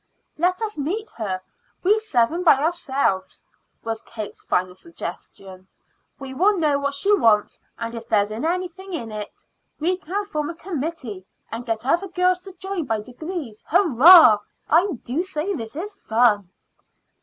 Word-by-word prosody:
"Let 365 +6 0
us 420 -7 -4
meet 395 +10 -3
her, 195 -5 -2 0.4
we 415 +4 +4
seven 325 - +1
by 330 - +7
ourselves," 275 - -1 0.4
was 225 -1 -3
Kate's 215 -3 -8
final 180 0 0
suggestion. 190 - -9 0.5
"We 270 -1 -8
will 380 +10 +4
then 370 - -2
know 290 -2 +2
what 280 0 -2
she 405 +8 +3
wants, 220 - +2 0.2
and 230 0 -5
if 230 0 -8
there 210 -3 +4
is 205 - -8
anything 360 - -3
in 230 -9 -4
it. 210 -1 -7 0.4
We 355 +4 +1
can 380 +5 -3
form 305 -7 -3
a 340 - -6
committee, 290 - -5 0.2
and 235 +2 -6
get 225 0 -2
other 345 +8 +1
girls 365 0 +1
to 385 +1 -12
join 385 -3 -4
by 225 -4 -1
degrees. 255 - -7
Hurrah! 325 - +8 0.3
I 355 +5 +3
do 265 +8 -1
say 370 +1 -3
this 225 -6 -6
is 400 +7 -5
fun." 220 - +2
300 Hz, 160 wpm, -23 LUFS, 225-365 Hz, 0.5 s, Hurrah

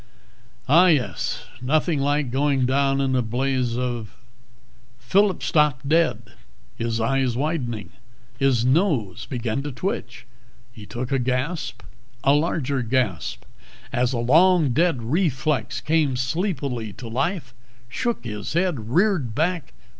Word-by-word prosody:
"Ah, 170 +7 +6
yes. 150 -8 0 0.2
Nothing 155 +4 +1
like 145 -2 0
going 135 0 +2
down 135 +1 +2
in 135 -1 +1
a 125 - +3
blaze 125 +1 -1
of 120 -4 -3 0.5
" 120 0 -32
Phillip 190 +10 +2
stopped 150 -4 +2
dead, 165 +2 +1 0.4
his 115 0 -2
eyes 125 +1 +1
widening. 130 -7 -2 0.5
His 130 -4 +2
nose 130 - +1
began 120 -1 -2
to 145 +1 -5
twitch. 130 -4 -4 0.5
He 105 -4 -12
took 120 +5 -5
a 135 - +2
gasp, 130 +7 -2 0.4
a 140 - +5
larger 145 -3 0
gasp, 110 - -1 0.5
as 125 0 +1
a 125 - -1
long 160 +5 +4
dead 150 -2 +1
reflex 130 - 0
came 150 -2 +1
sleepily 130 - -2
to 125 - -9
life, 135 - -2 0.3
shook 235 - -2
its 105 0 -5
head, 165 - 0
reared 165 - +1
back 165 0 -1
135 Hz, 130 wpm, -23 LUFS, 120-155 Hz, 0.5 s, Ah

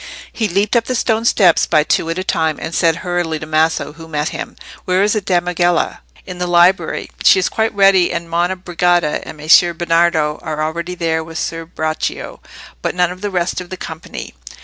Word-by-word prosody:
He 220 - -1
leaped 200 +4 0
up 230 -1 +3
the 255 - -2
stone 225 -1 0
steps 185 -7 +4
by 155 -2 +3
two 165 - 0
at 165 - -2
a 185 - -2
time, 160 -4 0
and 165 - -6
said 165 -1 +2
hurriedly 175 -3 -1
to 155 - -7
Maso, 155 -1 0
who 160 +1 -12
met 150 +1 -2
him— - - -7 0.3
"Where 185 +1 +2
is 210 - +2
the 215 - 0
damigella?" 175 -2 0 0.3
"In 180 -1 -8
the 180 - -1
library; 175 +2 +2
she - - +6
is 385 - +1
quite 220 -1 0
ready, 195 -3 +4
and 170 0 -4
Monna 175 +2 0
Brigida 175 -3 0
and - - -9
Messer 165 +3 +4
Bernardo 165 -2 +1
are 155 -2 -3
already 170 +3 -4
there 160 -2 -1
with 165 +1 -9
Ser 165 -1 -4
Braccio, 155 -2 -4 0.4
but - - -2
none 180 -1 +2
of 180 +1 -10
the 205 - -2
rest 180 -1 -1
of 180 - -11
the 185 - -6
company." 160 -2 -8
175 Hz, 205 wpm, -17 LUFS, 160-185 Hz, 0.4 s, she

